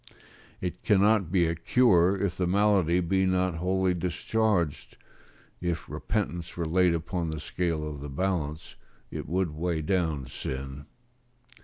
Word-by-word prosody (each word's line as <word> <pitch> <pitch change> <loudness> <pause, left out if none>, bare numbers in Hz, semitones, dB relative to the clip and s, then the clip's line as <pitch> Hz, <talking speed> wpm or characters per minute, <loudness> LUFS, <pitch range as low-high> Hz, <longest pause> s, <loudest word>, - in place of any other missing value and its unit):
It 90 -1 -4
cannot 105 -3 +3
be 90 -3 +3
a 80 - 0
cure 95 0 +3
if 95 -2 -1
the 90 -2 0
malady 95 -3 +3
be 95 +2 +1
not 90 -2 +1
wholly 95 +1 +1
discharged; 90 0 -1 0.6
if 85 -3 -2
repentance 85 +3 -3
were 85 - -1
laid 90 +1 +3
upon 85 0 -2
the 80 -1 -4
scale 80 -1 -2
of 75 -2 -6
the 75 - -6
balance, 80 -1 -2 0.4
it - - -5
would 90 -1 0
weigh 80 +1 -2
down 80 -6 0
sin. 65 +3 -6
85 Hz, 140 wpm, -28 LUFS, 80-95 Hz, 0.6 s, cannot